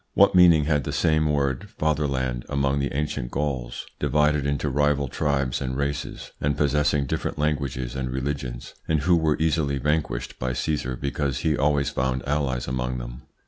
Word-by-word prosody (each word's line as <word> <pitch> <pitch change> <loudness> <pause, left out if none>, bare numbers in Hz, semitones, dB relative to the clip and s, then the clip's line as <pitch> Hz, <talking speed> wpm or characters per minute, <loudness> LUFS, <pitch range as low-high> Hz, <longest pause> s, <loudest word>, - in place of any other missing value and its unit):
What - - +6
meaning 85 -4 +7
had 75 -2 +1
the - - -3
same 80 -1 +2
word 70 -3 -1
"fatherland" 70 -5 0
among 70 0 +1
the 70 - -1
ancient 70 -3 -2
Gauls, 65 -4 -3
divided 75 -1 +2
into 70 +1 -1
rival 75 0 +1
tribes 70 -1 -1
and 65 -1 -2
races, 70 0 -3
and 70 0 0
possessing 75 0 +2
different - - -3
languages 70 -4 -1
and 65 -1 -2
religions, 65 -2 -4
and 80 -2 +1
who 90 +1 +4
were 80 -2 +2
easily 75 -3 +1
vanquished 75 -3 -1
by 65 0 -1
Caesar 65 -2 -1
because 70 0 -2
he 80 -2 +2
always 70 0 +1
found 65 0 -1
allies 65 -4 -1
among 65 0 -2
them? - - -8
70 Hz, 165 wpm, -25 LUFS, 65-75 Hz, -, meaning